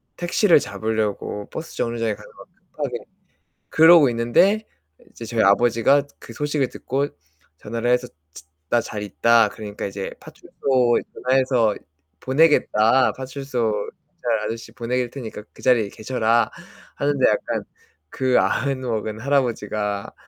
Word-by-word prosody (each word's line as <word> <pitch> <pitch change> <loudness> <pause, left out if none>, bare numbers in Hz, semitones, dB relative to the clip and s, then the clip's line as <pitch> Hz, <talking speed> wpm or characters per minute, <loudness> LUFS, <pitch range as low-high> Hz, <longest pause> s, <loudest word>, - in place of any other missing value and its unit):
택시를 175 0 +3
잡으려고 110 -4 -3
버스 160 - -7
정류장에 115 -2 -1
가서 - - -14
막 - - -13 0.2
급하게 - - -3 0.7
그러고 160 -3 +7
있는데 120 - +2 0.5
이제 115 - -9
저희 115 0 0
아버지가 120 +7 +4 0.2
그 - - -11
소식을 145 -3 -1
듣고 140 +2 -2 0.5
전화를 115 +5 -2
해서 125 0 +1 0.6
나 120 - +3
잘 105 - -6
있다. 115 +2 +3
그러니까 105 -2 -7
이제 100 0 -5
파출소 125 -3 0
전화해서 130 -4 +2 0.5
보내겠다. 130 - +3
파출소 130 -4 -3 0.5
경찰 115 -2 +2
아저씨 115 0 -6
보낼 120 +2 -2
테니까 115 -6 -8
그 - - -16
자리에 120 -5 +3
계셔라 115 +1 0 0.4
하는데 140 -2 +2
약간 - - -2 0.5
그 130 -1 +1
아흔 135 -1 0
먹은 110 -3 -3
할아버지가 110 -6 -1
120 Hz, 295 characters per minute, -22 LUFS, 110-135 Hz, 0.7 s, 그러고